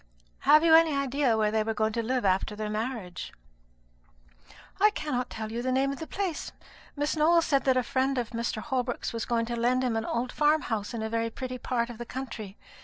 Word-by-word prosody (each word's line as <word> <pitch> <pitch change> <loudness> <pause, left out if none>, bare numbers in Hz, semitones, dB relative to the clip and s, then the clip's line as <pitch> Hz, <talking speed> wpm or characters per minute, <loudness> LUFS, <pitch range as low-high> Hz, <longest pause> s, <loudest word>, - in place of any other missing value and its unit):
"Have 305 +1 +8
you 330 -1 +5
any 320 -2 +6
idea 275 -3 +1
where 215 -1 +2
they 220 0 +2
were 220 +1 -2
going 220 0 0
to 230 - 0
live 250 0 -1
after 190 +2 +1
their 210 0 -4
marriage?" 215 -5 -4 1.5
"I 420 +2 +6
cannot 290 - -3
tell 220 0 -6
you 235 +1 -3
the 255 +1 -1
name 270 +1 +2
of 275 - -6
the 320 - -6
place. 380 -6 -3 0.4
Miss 290 +2 -1
Nowell 330 +2 +4
said 275 -3 +1
that 260 -1 +4
a 255 - +2
friend 265 +2 0
of 240 -2 -2
Mr. 230 -2 -3
Holbrook's 250 -3 -2
was 230 -1 -3
going 230 -1 0
to 235 +1 -3
lend 245 +2 +1
him 245 -3 0
an 225 0 -1
old 240 +2 -2
farm 300 +1 +3
house 220 0 -3
in 220 - -3
a - - -1
very 230 0 -1
pretty 255 +2 -6
part 240 -2 -1
of 235 - -11
the 240 - -5
country. 225 -6 -6
245 Hz, 225 wpm, -28 LUFS, 225-275 Hz, 1.5 s, Have